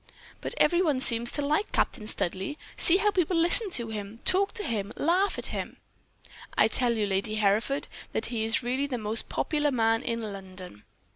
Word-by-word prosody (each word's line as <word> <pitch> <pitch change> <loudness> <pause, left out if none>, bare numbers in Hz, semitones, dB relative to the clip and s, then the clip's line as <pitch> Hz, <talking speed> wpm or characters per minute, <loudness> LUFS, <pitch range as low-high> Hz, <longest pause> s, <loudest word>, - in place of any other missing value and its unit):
"'But - - -4
every 350 0 +3
one 300 -7 0
seems 235 -2 +5
to 290 - -2
like 305 +9 -1
Captain 215 - -1
Studleigh. 190 +7 -3 0.2
See 345 - +7
how 415 +1 +1
people 360 -2 0
listen 350 +6 +5
to 235 -10 0
him, 210 0 -7
talk 395 +2 +3
to 430 - -5
him, 210 - -3
laugh 365 +6 0
at - - 0
him.' - - -5 0.8
"'I - - +4
tell 240 -2 0
you, 215 - 0
Lady 200 +2 -2
Hereford, 215 +6 0 0.2
that - - -3
he 230 -3 -3
is 225 +2 +1
really 260 +4 -2
the 255 -3 -4
most 215 0 -3
popular 295 -1 -1
man 225 -3 +1
in 230 -1 -4
London.' 185 - -9
235 Hz, 190 wpm, -27 LUFS, 215-310 Hz, 0.8 s, See